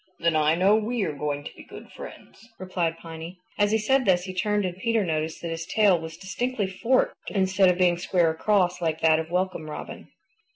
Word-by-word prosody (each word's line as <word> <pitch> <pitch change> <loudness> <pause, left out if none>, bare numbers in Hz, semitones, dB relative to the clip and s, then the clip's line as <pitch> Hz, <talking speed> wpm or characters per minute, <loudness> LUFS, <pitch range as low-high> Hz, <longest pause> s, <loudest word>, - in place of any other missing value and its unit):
"Then 170 -1 +1
I 155 +1 +3
know 190 +4 +4
we 220 +1 -1
are 155 - -2
going 145 0 -3
to - - -9
be - - -12
good - - -12
friends," 230 - -12
replied 175 -3 -2
Piny. 165 +2 -9 0.2
As 205 0 +4
he 220 - +3
said 265 +5 +2
this 180 -2 +3
he 185 0 -6
turned 210 +2 0
and 180 -1 -3
Peter 220 +2 0
noticed 160 -1 -3
that 170 - -3
his 165 +1 -5
tail 200 -3 +3
was 160 0 -8
distinctly 210 +4 -2
forked 230 +7 0
instead 190 -1 +3
of 180 - +1
being 175 -2 +3
square 175 -2 +2
across 180 +1 +1
like 160 -1 -1
that 160 -1 +4
of 160 0 -5
Welcome 180 -3 -2
Robin. 150 - -8
180 Hz, 210 wpm, -25 LUFS, 165-205 Hz, 0.2 s, know